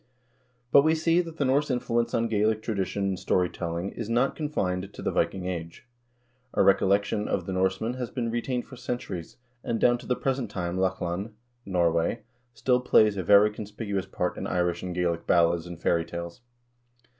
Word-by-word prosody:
But 140 - +8
we 160 +2 +3
see 165 +2 +3
that 165 -2 -9
the 145 - +1
Norse 140 +3 +2
influ 120 -2 0
ence 115 0 -3
on 115 0 +1
Gaelic 110 0 +1
tradition 100 -2 -2
and 95 -1 -3
story 90 -1 +1
telling 85 +2 -3
is 115 -2 -6
not 120 +3 +2
confined 100 - -2
to - - -10
the - - 0
Viking 95 -2 0
Age. 85 0 -5 0.7
A - - +4
recollection 100 +2 +3
of 90 - -1
the 95 - -4
Norsemen 95 +5 0
has 125 -2 -3
been 115 -3 -2
retained 120 +1 -2
for 130 - -11
centuries, 110 -9 -5 0.3
and 115 -1 -1
down 120 0 +4
to - - -12
the 125 - +1
present 130 -4 -1
time 90 -3 -3
Lochlann 95 +2 -2 0.3
(Norway) 85 +3 +1 0.3
still 125 +2 +2
plays 110 -4 +4
a 95 - -2
very 100 +3 +6
conspicuous 105 -2 -4
part 90 -1 -2
in - - -3
Irish 90 -1 0
and 90 -1 -5
Gaelic 85 -2 -1
ballads 85 0 +3
and 85 -1 -8
fairy 85 -1 +2
tales." 85 +4 -7
100 Hz, 185 wpm, -27 LUFS, 90-120 Hz, 0.7 s, But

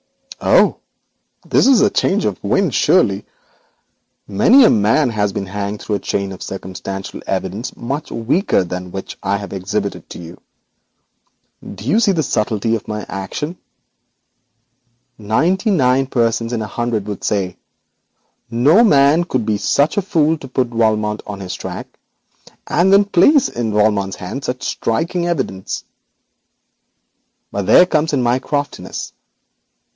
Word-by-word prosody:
'Oho, - - +4 0.7
this - - +3
is 270 -2 +5
a - - +4
change - - +1
of - - -3
wind, - - +1
surely. - - +3 1.0
Many 270 +1 +5
a - - +6
man 115 +6 +2
has 105 -2 0
been 95 - -4
hanged 100 +2 -5
on 105 - 0
a - - -2
chain 100 +1 -2
of 95 - -9
circumstantial 95 0 -6
evidence 95 +5 -3
much 140 +5 -4
weaker 120 - +1
than 90 +1 -5
this 90 - -13
which 95 - -7
I 100 +1 0
have 100 0 -8
exhibited 100 +1 -4
to - - -9
you. 85 +1 -11 1.2
Don't - - -9
you 145 - +2
see 205 -4 +3
the 160 -3 0
subtlety 110 -2 0
of 110 - -6
my 105 -1 -4
action? 120 - -5 1.6
Ninety 165 - +1
nine 135 -7 +2
persons 115 -2 0
in 115 -2 -1
a - - -5
hundred 120 -4 -1
would 105 -3 -6
say: 95 -3 -1 0.9
"No 140 - +4
man 150 -3 +4
could 130 -9 -2
be 105 -2 0
such 145 - +1
a - - +3
fool 160 -5 +2
as 160 - -5
to 135 - -9
put 125 -1 -1
Valmont 110 -2 0
on 100 -1 -6
his 90 -1 -5
own - - -7
track, - - -6 0.8
and 180 +4 +2
then 200 +1 +6
place 245 - +4
in 115 -2 -3
Valmont's 105 -2 +1
hands 95 +10 -6
such 125 0 -4
striking 170 +8 -1
evidence." 130 - -3 1.7
But 100 -2 -3
there 180 - +7
comes 160 -3 0
in 130 -3 +1
my 120 +2 +2
craftiness. 145 +1 -4
115 Hz, 150 wpm, -18 LUFS, 100-150 Hz, 1.7 s, there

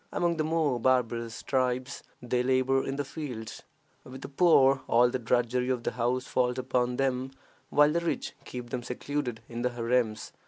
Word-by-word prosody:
Among 170 -1 0
the 155 - +1
more 155 -5 +1
barbarous 115 -2 0
tribes 130 0 -1 0.2
they 125 0 0
labor 130 +1 +2
in 135 - -3
the 145 0 -2
fields. 130 -7 -7 0.4
With 130 +1 -10
the - - -7
poor 135 -4 +4
all 120 +1 +4
the 130 - -2
drudgery 125 +1 0
of 125 -2 -1
the - - -1
house 125 +2 -1
falls 125 0 0
upon 125 -1 0
them, 130 0 0 0.4
while 150 +1 +5
the 170 - +1
rich 170 0 -3
keep 125 -1 -8
them 125 - -2
secluded 125 0 -4
in 120 0 -5
the 125 - +1
harems. 120 -2 -1
125 Hz, 180 wpm, -28 LUFS, 120-135 Hz, 0.4 s, while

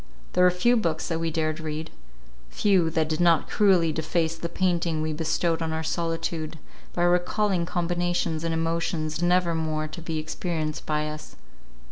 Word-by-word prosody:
There 180 - +4
were 180 - +7
few 210 +8 +3
books 165 -7 -1
that 165 -1 -1
we 165 0 0
dared 155 0 -1
read; 155 0 -5 0.6
few, 185 - +2
that 160 -1 0
did 155 0 -2
not 170 -3 +4
cruelly 185 -6 +3
deface 160 +1 0
the 170 +1 -5
painting 170 -3 0
we 155 0 -1
bestowed 165 +1 0
on 160 -1 -1
our 160 0 -2
solitude, 165 -1 -2 0.4
by 175 - 0
recalling 180 +1 +2
combinations 175 -2 -1
and 165 - -1
emotions 165 -1 -1
never 175 0 +3
more 155 -1 -1
to 160 +3 -8
be 165 -1 -3
experienced 155 0 -3
by 150 0 0
us. 155 0 -8
165 Hz, 165 wpm, -26 LUFS, 155-175 Hz, 0.6 s, were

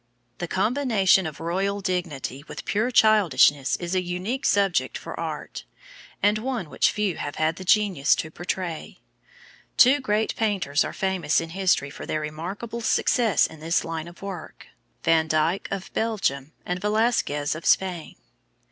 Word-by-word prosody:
The 175 - -3
combination 200 - +2
of 155 - -8
royal 195 +5 -1
dignity 165 -8 -3
with - - -8
pure 220 +4 0
childishness 185 - +4
is 175 0 -5
a 185 - +2
unique 185 +10 -2
subject 200 -3 +1
for - - -8
art, - - -5 0.6
and 210 +1 +3
one 235 - -4
which - - +3
few 210 -5 -1
have 145 - -5
had 155 +1 0
the 190 - -7
genius 190 -7 +3
to 160 - -5
portray. 175 -1 -5 0.8
Two 265 +4 +6
great 215 -4 0
painters 190 -10 +1
are - - -4
famous 190 -5 0
in 165 0 -6
history 180 -6 +1
for - - -9
their 155 - -1
remarkable 185 +10 -5
success 225 -2 +2
in 160 - -8
this 165 +2 0
line 165 0 -4
of 175 +3 -13
work, 190 -5 -8 0.3
Van 165 -1 +3
Dyck, 160 +4 0
of 195 -1 -5
Belgium, 160 -11 -1
and 180 0 -3
Velasquez, 210 -9 +1
of 155 +1 -8
Spain. 180 -4 +1
185 Hz, 155 wpm, -25 LUFS, 160-210 Hz, 0.8 s, Two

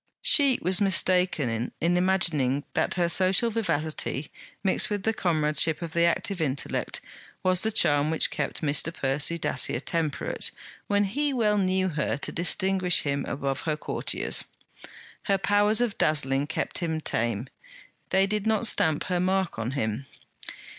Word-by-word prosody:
She 285 - +5
was 185 +3 +2
mistaken 180 - +1
in 170 +2 +1
imagining 170 -7 +1
that - - +1
her 175 -2 +1
social 190 +6 +3
vivacity, 160 -8 -2 0.3
mixed 190 - +2
with 205 -2 -3
comradeship 155 -3 +1
of 165 -1 -6
the 170 0 +3
active 175 +2 -1
intellect, 140 -3 -2 0.4
was 185 -1 +3
the 220 - +1
charm 145 -6 +3
which 160 - +1
kept - - -3
Mr. 150 +2 +1
Percy 145 +3 -1
Dacier 130 -6 0
temperate 155 0 -2 0.4
when 205 0 +2
he 280 +8 0
well 210 -4 +2
knew 185 0 +1
her 150 -3 -2
to - - -4
distinguish 185 +1 +2
him 140 -1 -2
above 135 -1 -3
her 150 - 0
courtiers. - - -1 0.8
Her 195 -1 +2
powers 205 +3 +2
of 235 -4 -1
dazzling 145 -2 +1
kept 165 - -2
him 160 -2 -2
tame; 115 -4 -2 0.6
they 190 +1 +3
did 210 +1 -2
not 220 0 +1
stamp 160 -8 +2
her 180 -1 -1
mark 185 -6 0
on 115 +3 -3
him. 130 0 -3
170 Hz, 145 wpm, -26 LUFS, 145-195 Hz, 0.8 s, She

